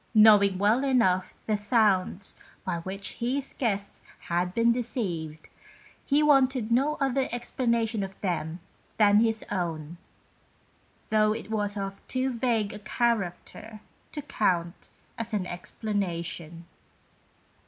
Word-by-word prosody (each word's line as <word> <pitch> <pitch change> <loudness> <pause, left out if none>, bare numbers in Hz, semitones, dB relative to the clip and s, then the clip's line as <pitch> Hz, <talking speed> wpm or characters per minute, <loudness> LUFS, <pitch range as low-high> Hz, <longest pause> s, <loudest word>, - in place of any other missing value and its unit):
Knowing 210 -3 +7
well 215 +7 +3
enough 210 -9 +2
the 215 - +1
sounds 205 -3 +1 0.3
by 180 -2 -1
which 190 +3 -6
his 260 +3 -2
guests 205 -5 -2 0.3
had 175 +1 +1
been 230 +4 +3
deceived, 190 - -3 0.6
he 295 +1 +2
wanted 265 -5 +3
no 275 +6 +3
other 270 -1 +1
explanation 235 -2 -1
of 195 0 -6
them 170 -3 -2 0.4
than 205 -1 +6
his 225 -1 +1
own, 170 -3 -3 1.1
though 215 -1 +4
it 220 0 -7
was 205 -1 -1
of 195 0 -5
too 260 +1 -1
vague 230 -4 0
a 210 - -8
character 215 -1 -2 0.3
to 295 - -6
count 180 -10 -1 0.3
as 230 -1 -3
an 195 -3 -1
explanation. 175 -3 -4
210 Hz, 120 wpm, -27 LUFS, 185-235 Hz, 1.1 s, Knowing